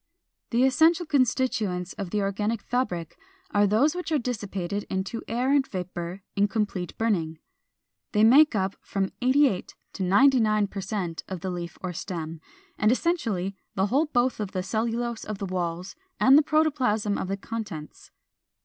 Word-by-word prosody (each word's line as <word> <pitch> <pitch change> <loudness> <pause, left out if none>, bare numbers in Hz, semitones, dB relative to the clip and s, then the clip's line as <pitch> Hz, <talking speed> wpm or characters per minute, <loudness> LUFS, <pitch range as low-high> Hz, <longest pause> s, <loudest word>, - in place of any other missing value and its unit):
The 240 +1 +2
essential 320 +6 +4
constituents 245 - 0
of 195 -3 -5
the 210 +3 0
organic 210 +3 -1
fabric 180 -10 -2 0.3
are 205 0 +4
those 240 +10 +3
which 355 -2 -5
are 310 - +3
dissipated 205 -6 -3
into 190 +4 -3
air 245 +4 0
and 285 -1 +4
vapor 180 0 -5
in 200 0 +3
complete 205 -4 -3
burning. 170 -8 0 0.7
They 210 0 +3
make 270 +4 +7
up 190 -1 0
from 195 -1 -2
88 260 -5 +2 0.2
to - - -7
99 215 +1 +4
per 195 - -5
cent 190 -4 -3
of 185 -3 -6
the 190 -1 -3
leaf 175 -1 -6
or 180 -1 -3
stem, 165 -2 -5 0.4
and 215 +2 +4
essentially 230 - 0 0.2
the 190 - +2
whole 275 +9 +2
both 245 -4 +1
of 205 -3 -4
the 185 - -2
cellulose 230 +3 -2
of 215 -1 -5
the 195 - -4
walls 180 0 -3 0.2
and 265 - +7
the 300 - +8
protoplasm 275 -10 +1
of - - -3
the 195 +1 -2
contents. 200 -8 -7
210 Hz, 160 wpm, -26 LUFS, 185-250 Hz, 0.7 s, the